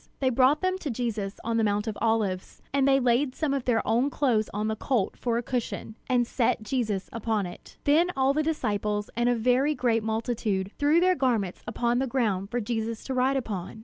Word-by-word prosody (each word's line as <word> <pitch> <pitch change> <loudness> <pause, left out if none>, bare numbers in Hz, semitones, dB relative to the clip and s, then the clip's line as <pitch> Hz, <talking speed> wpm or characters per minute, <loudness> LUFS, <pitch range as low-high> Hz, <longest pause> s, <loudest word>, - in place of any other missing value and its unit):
They 260 -2 +2
brought 260 +4 +4
them 370 0 0
to 310 - -4
Jesus 220 -5 -3
on 230 0 0
the 225 - +2
Mount 205 0 +1
of 220 -2 -3
Olives; 215 -5 0
and 275 -1 +3
they 270 0 +5
laid 255 +2 +2
some 305 -3 0
of 275 -3 -2
their 235 -3 +1
own 240 +5 +2
clothes 245 -7 +1
on 210 +1 -2
the 220 - -1
colt 225 -3 -1
for 235 -2 -1
a 240 - -2
cushion, 240 -3 -3 0.2
and 245 -1 +3
set 235 -2 0
Jesus 215 -4 -1
upon 220 -3 -1
it. 175 - -11
Then 320 +5 +4
all 265 +1 +3
the 305 - +1
disciples 210 -9 -1
and 240 +1 +2
a 245 - +3
very 255 +6 +2
great 240 -3 +1
multitude 220 -3 -1
threw 295 +3 +4
their 370 +1 +4
garments 230 - 0
upon 235 +2 0
the 265 - 0
ground 210 -7 0
for 245 - -1
Jesus 225 0 -3
to 265 - -4
ride 260 +2 +2
upon. 215 -5 -5
235 Hz, 210 wpm, -27 LUFS, 215-265 Hz, 0.2 s, they